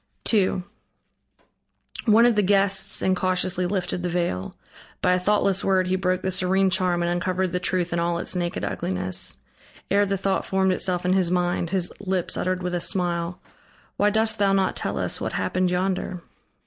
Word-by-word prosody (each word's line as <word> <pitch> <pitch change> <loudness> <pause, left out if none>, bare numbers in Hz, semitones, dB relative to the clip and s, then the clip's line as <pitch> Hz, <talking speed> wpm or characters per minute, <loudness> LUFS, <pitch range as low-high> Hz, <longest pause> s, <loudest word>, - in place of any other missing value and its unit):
II 190 -3 +2 1.4
One 225 +1 +6
of 240 -2 +4
the 210 - +3
guests 195 0 +2
incautiously 185 -1 +1
lifted 185 -1 -2
the 180 - -2
veil. 170 - -2 0.4
By 180 - +2
a 180 - +2
thoughtless 200 0 +2
word 190 -1 +2
he 185 +1 0
broke 185 0 -1
the 190 - 0
serene 190 +1 +2
charm 180 -1 +1
and 170 - 0
uncovered 180 +1 -1
the 180 - -1
truth 180 -1 -1
in 170 - 0
all 170 0 0
its 175 - -2
naked 175 -1 -2
ugliness. 95 0 -3 0.5
Ere 200 +1 +3
the 195 0 0
thought 195 0 0
formed 190 0 +1
itself 180 -1 0
in 180 - +3
his 185 -3 +2
mind, 175 -1 0
his 180 -1 -1
lips 190 -3 -2
uttered 185 0 -1
with 180 0 -2
a 175 - -1
smile: 175 -1 -1 0.6
"Why 205 - +3
dost 220 +1 0
thou 200 -1 +3
not 195 -1 +1
tell - - -3
us - - -2
what - - -3
happened 185 0 0
yonder?" 180 -1 -2
185 Hz, 180 wpm, -24 LUFS, 175-195 Hz, 1.4 s, One